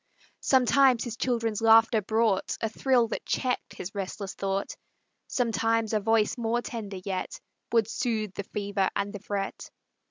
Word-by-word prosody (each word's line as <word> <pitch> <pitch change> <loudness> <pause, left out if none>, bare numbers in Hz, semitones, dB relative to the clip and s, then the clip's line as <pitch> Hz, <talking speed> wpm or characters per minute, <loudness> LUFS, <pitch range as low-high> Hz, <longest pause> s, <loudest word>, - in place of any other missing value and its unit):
Sometimes 260 -1 +4
his 235 -2 -5
children's 230 -3 -1
laughter 225 0 +6
brought 220 -1 +1
A 225 - 0
thrill 245 +1 +2
that - - -4
checked 255 -2 -2
his 185 - -7
restless 195 0 -5
thought; 195 0 -2 0.5
Sometimes 225 -2 0
a 215 - +3
voice 225 +2 +1
more 235 +1 0
tender 210 -4 -6
yet 190 -2 -3 0.3
Would 230 -3 +3
soothe 220 -4 -2
the 200 - -5
fever 200 -1 -1
and 200 0 -2
the 205 - -6
fret. 200 -1 -4
220 Hz, 150 wpm, -27 LUFS, 200-235 Hz, 0.5 s, laughter